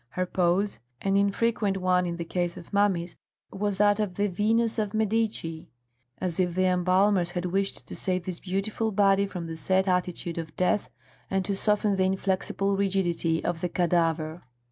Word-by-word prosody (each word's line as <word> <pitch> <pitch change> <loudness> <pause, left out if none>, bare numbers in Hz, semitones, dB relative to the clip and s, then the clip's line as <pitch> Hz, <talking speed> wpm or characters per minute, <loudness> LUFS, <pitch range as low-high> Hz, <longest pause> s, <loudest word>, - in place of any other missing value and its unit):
Her 185 - -2
pose, 180 +3 +1 0.2
an 195 0 +1
infrequent 200 0 +1
one 180 -1 +2
in 170 0 -3
the 170 - -4
case 175 0 -2
of 175 - -12
mummies, 185 -4 +1 0.4
was 205 0 -2
that 205 +1 +4
of 205 -4 -1
the 205 - +1
Venus 220 +4 +1
of 210 0 -2
Medici, 215 -7 -1 0.5
as 180 -1 -3
if 175 -2 +1
the 185 0 +2
embalmers 185 0 +3
had 175 0 -3
wished 195 +2 -2
to - - -8
save 185 -2 -1
this 180 -2 -4
beautiful 200 +4 -2
body 200 -1 +3
from 180 -3 -6
the 165 0 -5
set 185 +5 +1
attitude 180 -2 -1
of 160 -2 -7
death 185 +3 +1 0.4
and 190 -1 0
to 200 - -1
soften 210 0 +2
the 190 - +3
inflexible 195 +1 0
rigidity 180 -4 0
of 170 -2 -1
the 180 - -1
cadaver. 165 -2 0
190 Hz, 175 wpm, -27 LUFS, 175-200 Hz, 0.5 s, that